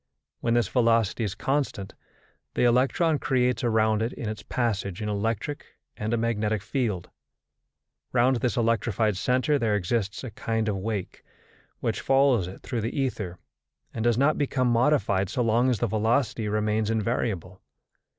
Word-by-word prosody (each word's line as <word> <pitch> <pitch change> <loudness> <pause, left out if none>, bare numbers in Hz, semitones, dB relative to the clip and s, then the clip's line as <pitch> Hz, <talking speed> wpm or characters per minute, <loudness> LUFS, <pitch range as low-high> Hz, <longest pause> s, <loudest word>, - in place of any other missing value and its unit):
When 115 0 +1
this 120 -4 +2
velocity 115 -2 +2
is 100 -3 -2
constant, 135 -8 -2 0.6
the - - +2
electron 135 +6 +3
creates 125 -1 +1
around 110 -2 +2
it 115 +2 -1
in 115 - -5
its 110 -1 -5
passage 105 -5 -2
an 105 -1 -3
electric 115 +7 -2 0.3
and 105 +1 -3
a 120 - +2
magnetic 110 -3 0
field; 110 -10 -2 1.0
round 125 +1 +3
this 125 +1 -1
electrified 115 -2 +1
centre 130 +8 +1
there 110 -4 +1
exists 105 +2 -1
a 125 - -6
kind 110 +1 -2
of 105 -2 0
wake, 100 -1 -4 0.6
which - - -1
follows 135 -8 +3
it 95 - -10
through 120 - -3
the 115 +6 -3
ether 105 -9 -2 0.6
and 110 - -3
does 120 -1 +3
not 140 +4 +3
become 130 -3 +1
modified 115 -6 +2
so 125 - 0
long 120 +3 +3
as 125 - +1
the 110 - 0
velocity 110 +1 0
remains 105 0 0
invariable. 110 -5 -2
115 Hz, 155 wpm, -26 LUFS, 105-125 Hz, 1.0 s, electron